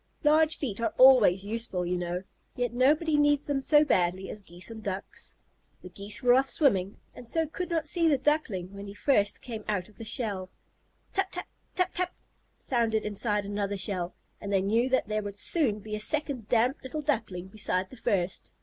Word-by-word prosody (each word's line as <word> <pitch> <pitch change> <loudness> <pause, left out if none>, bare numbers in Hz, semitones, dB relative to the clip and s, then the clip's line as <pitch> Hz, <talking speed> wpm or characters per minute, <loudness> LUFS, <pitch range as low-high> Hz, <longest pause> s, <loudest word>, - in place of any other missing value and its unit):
Large 310 +1 +4
feet 230 -6 -4
are 230 - -1
always 230 -8 +6
useful, 215 -4 -2
you 180 +1 -1
know, 175 +1 -3 0.3
yet 245 -3 -2
nobody 295 +5 +3
needs 290 0 +3
them 280 -2 -1
so 295 +2 +5
badly 185 -5 0
as 210 - -8
Geese 175 +3 -4
and 220 -1 -8
Ducks. 200 -1 -6 0.5
The 180 - -10
Geese 200 +6 -5
were 245 0 +6
off 265 +1 +3
swimming, 200 - +1 0.2
and 245 - -11
so 325 +6 +2
could 355 +4 -5
not 325 -2 -1
see 335 +1 +2
the 295 -3 +4
Duckling 230 - -1
when 200 0 -8
first 205 -5 +2
he - - -20
came 225 -3 -6
out 185 -3 -2
of 210 - -22
the 230 - -8
shell. 210 -5 -1 0.6
"Tap 390 -1 0
tap, 360 - -5 0.3
tap 365 - 0
tap," 365 0 -2 0.4
sounded 230 -4 0
inside 210 0 -1
another 200 0 -2
shell, 185 -2 -2 0.3
and 200 - -5
they 195 -1 +2
knew 230 +6 +2
that 260 -4 +1
there 215 0 -1
would 205 -1 -7
soon 250 -3 +2
be 215 +1 -9
a 210 - -2
second 245 +1 -1
damp 245 +4 +2
little 285 +4 -5
Duckling 190 - -2
beside 190 -2 -1
the 260 - -11
first. 195 -6 -1
220 Hz, 195 wpm, -28 LUFS, 200-280 Hz, 0.6 s, always